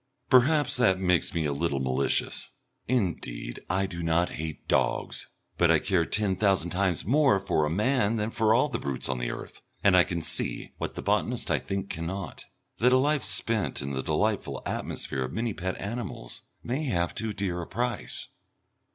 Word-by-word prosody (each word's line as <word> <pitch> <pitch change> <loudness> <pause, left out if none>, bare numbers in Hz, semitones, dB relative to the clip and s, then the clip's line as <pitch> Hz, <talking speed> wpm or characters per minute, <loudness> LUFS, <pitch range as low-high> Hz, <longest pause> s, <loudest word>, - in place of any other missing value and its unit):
Perhaps 145 +4 +5
that 95 -7 +3
makes 90 -4 +2
me 80 -2 -1
a 70 - 0
little 70 -1 0
malicious. 65 +1 0 0.4
Indeed 95 - -2
I 95 +1 +1
do 85 -3 -5
not 85 +1 +1
hate 80 0 -6
dogs, - - 0 0.3
but - - +5
I - - +6
care 85 -4 +1
ten 105 -3 +1
thousand 95 -4 +2
times 90 -2 0
more 135 -1 +4
for 80 -5 +1
a - - -1
man 110 - +2
than 110 0 -1
for 110 -1 +2
all 130 +5 +4
the 125 -6 -3
brutes 70 -2 -1
on 65 -2 -1
the - - -2
earth, - - -7 0.2
and 95 -2 +6
I 90 - +7
can 85 -2 -3
see, - - -1
what - - -4
the - - -5
botanist - - 0
I - - +3
think 100 0 -4
cannot, 85 +2 -5 0.3
that 125 +2 +5
a - - +7
life 145 +2 +2
spent 110 -10 0
in 70 - -4
the 65 -1 -2
delightful - - -1
atmosphere 70 - -3
of 65 - -7
many 115 -1 -1
pet 95 0 -4
animals 105 - -5 0.2
may 135 +6 -2
have 85 -9 0
too 110 -1 -3
dear 95 -4 -2
a 85 - -7
price.... 120 +4 -3
95 Hz, 185 wpm, -28 LUFS, 85-115 Hz, 0.4 s, I